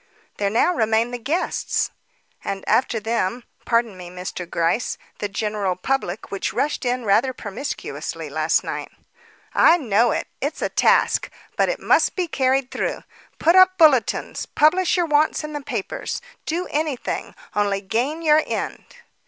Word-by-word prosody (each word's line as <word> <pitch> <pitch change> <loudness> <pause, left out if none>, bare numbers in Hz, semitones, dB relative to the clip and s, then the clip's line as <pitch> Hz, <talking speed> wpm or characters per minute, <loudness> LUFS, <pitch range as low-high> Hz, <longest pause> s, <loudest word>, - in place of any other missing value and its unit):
"There 200 -1 +1
now 230 - +3
remain 225 -3 +1
the 245 - -4
guests." 300 +9 -1 0.5
"And 195 0 -4
after 245 -3 +2
them 225 +1 -1 0.2
(pardon 230 -3 +1
me, 180 -1 -9
Mr. 180 -1 -6
Gryce) 170 +8 0 0.2
the 205 - -2
general 205 -2 -1
public 195 -1 -2
which 195 - -2
rushed 290 -2 -1
in 245 -1 -1
rather 235 +6 +3
promiscuously 225 +4 -5
last - - +1
night." - - -5 0.6
"I 335 - +6
know 235 - +2
it; - - -1 0.2
it's - - -2
a - - 0
task, - - +3 0.3
but - - +2
it - - -2
must - - +3
be 365 -2 -1
carried 265 -3 +1
through. - - -2 0.3
Put 335 +3 +3
up 370 0 +7
bulletins, 300 -8 +3
publish 360 +5 +3
your 350 - +2
wants 305 0 +2
in 305 0 -6
the 295 - -4
papers; 275 - -4 0.3
do 345 +3 -1
anything, 300 -4 -2 0.2
only 205 -1 +1
gain 245 +12 -2
your 310 -1 +5
end." - - -3
245 Hz, 155 wpm, -22 LUFS, 205-305 Hz, 0.6 s, up